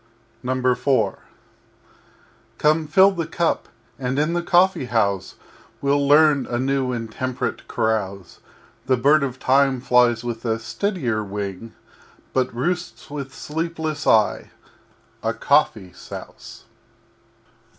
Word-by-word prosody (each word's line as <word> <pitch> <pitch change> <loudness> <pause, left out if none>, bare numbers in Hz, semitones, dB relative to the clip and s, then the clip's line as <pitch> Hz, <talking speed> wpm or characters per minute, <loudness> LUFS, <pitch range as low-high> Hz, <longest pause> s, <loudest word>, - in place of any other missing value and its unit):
IV 125 -3 +1 1.4
Come, 155 +1 +2
fill 190 +5 +6
the 170 -4 -3
Cup, 170 0 -1 0.3
and 130 0 -2
in 155 +3 +1
the 175 - 0
Coffee 175 -4 +3
house 100 -6 0 0.4
We'll 140 0 +1
learn 145 -2 +5
a 120 - -2
new 135 0 0
and 115 -2 -4
temperate 130 +1 -4
Carouse 100 -4 -2 0.5
The 130 -1 +3
Bird 145 +5 +4
of 130 -2 -3
Time 135 0 +3
flies 120 -2 +3
with 115 -1 -5
a 115 -2 0
steadier 120 - -2
wing 100 +1 -6 0.6
But 130 -1 +1
roosts 175 +5 -3
with 140 -2 -5
sleepless 160 0 -4
Eye 110 -2 +3 0.7
a 115 0 -1
Coffee 115 - +1
Souse! - - -10
130 Hz, 115 wpm, -22 LUFS, 115-150 Hz, 1.4 s, fill